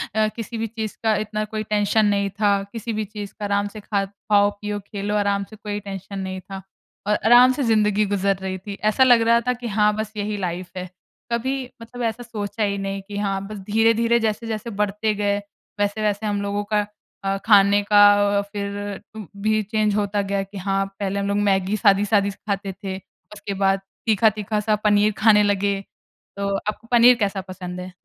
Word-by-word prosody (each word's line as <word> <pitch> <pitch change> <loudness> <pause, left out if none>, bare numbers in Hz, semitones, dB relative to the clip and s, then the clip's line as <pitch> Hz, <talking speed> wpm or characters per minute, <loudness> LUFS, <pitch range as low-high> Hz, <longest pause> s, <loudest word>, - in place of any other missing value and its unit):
अ, 215 0 +3
किसी 230 0 -5
भी 225 0 -2
चीज़ 220 -1 -5
का 220 -1 +3
इतना 215 0 -2
कोई 215 0 -4
टेंशन 210 0 +2
नहीं 200 -1 +1
था। 205 +1 +1 0.2
किसी 230 0 -5
भी 215 0 -2
चीज़ 205 -1 -8
का 210 - -3
आराम 205 0 0
से 215 +1 -9
खा 200 -1 -1
खाओ 205 +1 +2
पियो 210 0 -3
खेलो 205 0 -3
आराम 200 -1 +1
से 215 - -11
कोई 205 0 -5
टेंशन 195 0 -7
नहीं 190 0 -4
था। 195 +1 -8 0.5
और 210 - +3
आराम 245 +3 +7
से 280 - -2
ज़िन्दगी 215 -2 +2
गुज़र 200 0 +1
रही 190 0 -3
थी, 200 +2 -8
ऐसा 215 +6 +2
लग 245 -3 +6
रहा 230 +1 +4
था 250 - +3
कि 245 -1 -7
हाँ, 210 0 +2
बस 215 0 -4
यही 205 0 -2
लाइफ 180 -1 -4
है। 185 0 -5 0.4
कभी 260 +3 -1 0.2
मतलब 245 +2 -9
ऐसा 230 +1 -2
सोचा 215 -1 -4
ही 200 -1 0
नहीं 195 0 -3
कि 205 -1 -6
हाँ, 195 -1 -1
बस 215 0 -7
धीरे-धीरे, 230 +2 +3
जैसे 220 0 -1
जैसे 220 +1 -4
बढ़ते 210 +1 -1
गए, 205 0 0 0.4
वैसे-वैसे 205 +1 0
हम 205 -1 -1
लोगों 200 0 -2
का 210 -1 +2 0.4
अ, 195 0 0
खाने 205 -1 +6
का 205 0 +6 0.3
अ - - +4
अ, - - +1
फिर 205 0 -4
उम, 215 -4 -7
भी 215 +1 +2
चेंज 215 0 0
होता 205 0 0
गया 200 0 -1
कि 195 +1 -11
हाँ, 195 +1 0
पहले 200 0 -1
हम 200 - -1
लोग 200 0 0
मैगी 195 0 +1
सादी-सादी 200 -1 +3
सी - - -15
खाते 195 -1 -2
थे। 190 -1 -3 0.4
उसके 205 -1 -6
बाद 195 0 +3 0.3
तीखा-तीखा 215 -1 +2
सा 210 0 +1
पनीर 210 0 +4
खाने 210 -1 +5
लगे। 200 -1 +1 0.6
तो 200 0 -1
आपको 210 +3 -5
पनीर 245 +1 +7
कैसा 200 -2 0
पसंद 185 -1 -7
है? 185 +1 -7
205 Hz, 205 wpm, -22 LUFS, 200-215 Hz, 0.6 s, आराम